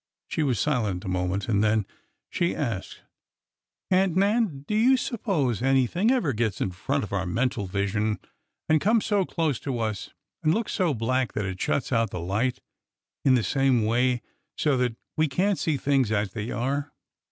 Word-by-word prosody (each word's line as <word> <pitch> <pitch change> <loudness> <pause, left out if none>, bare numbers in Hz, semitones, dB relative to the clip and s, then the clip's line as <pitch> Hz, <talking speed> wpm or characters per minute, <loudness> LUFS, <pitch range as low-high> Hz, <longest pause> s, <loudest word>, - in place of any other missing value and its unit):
She - - -1
was 135 -6 +1
silent 110 -11 0
a - - -5
moment, 90 +1 -1
and 105 -2 +2
then 110 -1 +2 0.5
she 170 0 0
asked: 105 -5 -4 0.9
Aunt 185 -2 +3
Nan, 200 -7 +1
do - - -2
you 245 +5 +5
suppose 180 - -1
anything 135 - +2
ever 240 - +2
gets 110 -3 -1
in 95 - -1
front 135 +10 -2
of 105 - -6
our 95 -2 -1
mental 115 +2 -1
vision 105 +3 0 0.5
and 155 -1 +3
comes 220 +2 +3
so 205 -3 +2
close 160 -8 -1
to 135 -4 -3
us 110 -3 -3 0.3
and 155 +3 +3
looks 225 0 -2
so 175 -7 +1
black 125 +3 0
that 105 - -2
it 95 -1 -5
shuts 135 - 0
out 115 -3 +2
the 90 - -5
light 105 +9 0 0.7
in 130 -2 +5
the 120 - +2
same 135 -4 +2
way, 120 +2 +1 0.3
so 150 -3 +2
that 125 -2 0 0.2
we 155 0 +3
can't 185 +7 +1
see 155 -3 0
things 135 -4 +1
as 105 -2 0
they 110 +1 -4
are 140 +4 -2
130 Hz, 180 wpm, -26 LUFS, 110-155 Hz, 0.9 s, you